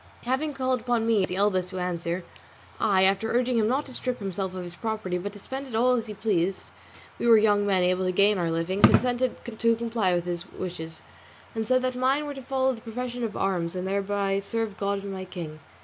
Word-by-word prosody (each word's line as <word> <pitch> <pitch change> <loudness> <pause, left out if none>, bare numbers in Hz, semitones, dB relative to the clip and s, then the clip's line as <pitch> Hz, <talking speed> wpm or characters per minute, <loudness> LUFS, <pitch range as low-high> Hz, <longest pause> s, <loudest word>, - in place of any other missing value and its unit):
Having 265 +5 0
called 260 -1 0
upon 235 -1 +1
me 225 -3 +3
as 185 - 0
the 180 - -2
eldest 190 -2 +1
to 185 - -5
answer, 175 0 -2 0.6
I, 195 -4 +3
after 195 +3 +2
urging 245 0 +2
him 215 - +3
not 265 +5 +1
to 265 - -8
strip 250 0 -2
himself 190 -2 -3
of 185 - -4
his 175 -1 -7
property 215 -3 -2
but 200 +3 -4
to - - -10
spend 265 +6 -6
it 240 - -6
all 245 +3 +4
as 235 -2 -1
he 210 - -6
pleased, 195 -3 0 0.5
for - - -3
we - - +3
were 230 -1 +8
young 205 -1 +3
men 190 -2 +3
able 185 +1 +2
to 185 - +2
gain 200 +2 +4
our 170 -1 0
living, 165 +4 -1
consented 250 0 +4
to 230 0 +1
comply 225 -5 0
with 175 0 -1
his 175 +1 -4
wishes, 165 -3 -6 0.5
and 225 -2 -2
said 255 +1 +3
that 255 0 0
mine 265 +4 +2
were 290 - -4
to 270 - -8
follow 265 0 +1
the 225 - -10
profession 245 +2 -4
of 220 -3 -3
arms 180 -3 0
and 185 +1 -3
thereby 200 0 0
serve 220 +1 -2
God 200 0 -1
and 200 -1 -5
my 190 -1 -5
king. 170 -4 -7
205 Hz, 235 wpm, -27 LUFS, 185-240 Hz, 0.6 s, were